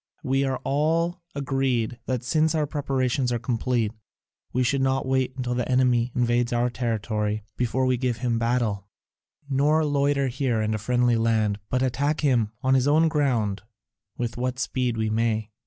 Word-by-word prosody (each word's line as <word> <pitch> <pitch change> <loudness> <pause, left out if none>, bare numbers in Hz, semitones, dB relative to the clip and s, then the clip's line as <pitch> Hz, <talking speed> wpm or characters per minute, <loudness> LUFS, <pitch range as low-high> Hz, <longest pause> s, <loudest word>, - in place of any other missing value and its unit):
We 135 +1 +1
are 135 -1 -1
all 165 +5 0
agreed 130 -4 -1
that 130 -1 -1
since 155 +5 +1
our 155 -1 +1
preparations 135 -3 -1
are 120 - +1
complete 120 -2 -1 0.6
we 125 - +1
should 135 +3 +1
not 135 0 +1
wait 130 -1 0
until 125 -1 -2
the 125 +1 -2
enemy 125 -1 +2
invades 120 0 +1
our 120 0 +1
territory 110 -3 -2
before 125 +2 0
we 130 -1 +2
give 125 -2 -1
him 120 -1 -1
battle, 115 -4 0 0.6
nor 145 +3 +2
loiter 140 -1 +1
here 125 -2 -1
in 110 0 0
a 110 - -2
friendly 120 +1 +2
land, 110 -2 +1
but 130 0 +1
attack 140 +4 0
him 120 -7 +2
on 130 0 +3
his 130 0 +3
own 160 +3 +4
ground 120 - 0 0.6
with 120 -1 -3
what 125 +1 -2
speed 125 -2 -1
we 110 -1 0
may. 110 -1 0
125 Hz, 170 wpm, -25 LUFS, 115-135 Hz, 0.6 s, own